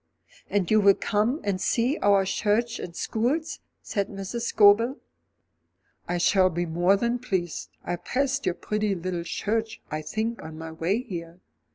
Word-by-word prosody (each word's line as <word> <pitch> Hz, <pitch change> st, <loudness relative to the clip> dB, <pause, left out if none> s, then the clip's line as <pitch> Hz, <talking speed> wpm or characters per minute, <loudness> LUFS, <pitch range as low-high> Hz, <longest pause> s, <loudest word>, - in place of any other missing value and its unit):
"And 200 Hz, -3 st, 0 dB
you 215 Hz, 0 st, +5 dB
will 200 Hz, -1 st, +6 dB
come 220 Hz, +7 st, 0 dB
and 195 Hz, -2 st, -1 dB
see 250 Hz, +6 st, +1 dB
our 200 Hz, -1 st, +4 dB
church 225 Hz, +4 st, 0 dB
and 170 Hz, -, -7 dB
schools?" 275 Hz, -, -1 dB, 0.2 s
said 200 Hz, -3 st, -1 dB
Mrs. 205 Hz, +4 st, -4 dB
Scobel. 220 Hz, +6 st, +5 dB, 1.1 s
"I 175 Hz, -, -1 dB
shall 185 Hz, +1 st, +4 dB
be 175 Hz, 0 st, -2 dB
more 175 Hz, +4 st, +3 dB
than 235 Hz, +3 st, 0 dB
pleased. 185 Hz, -9 st, -3 dB
I 175 Hz, -, -2 dB
passed 275 Hz, +2 st, -1 dB
your 175 Hz, -, +1 dB
pretty 210 Hz, -1 st, -1 dB
little 175 Hz, -1 st, -3 dB
church, 220 Hz, +5 st, -2 dB
I 155 Hz, 0 st, -2 dB
think, 220 Hz, +9 st, -3 dB
on 160 Hz, 0 st, -9 dB
my 160 Hz, 0 st, -7 dB
way 180 Hz, +9 st, -1 dB
here. 170 Hz, -6 st, -7 dB
205 Hz, 160 wpm, -26 LUFS, 175-230 Hz, 1.1 s, will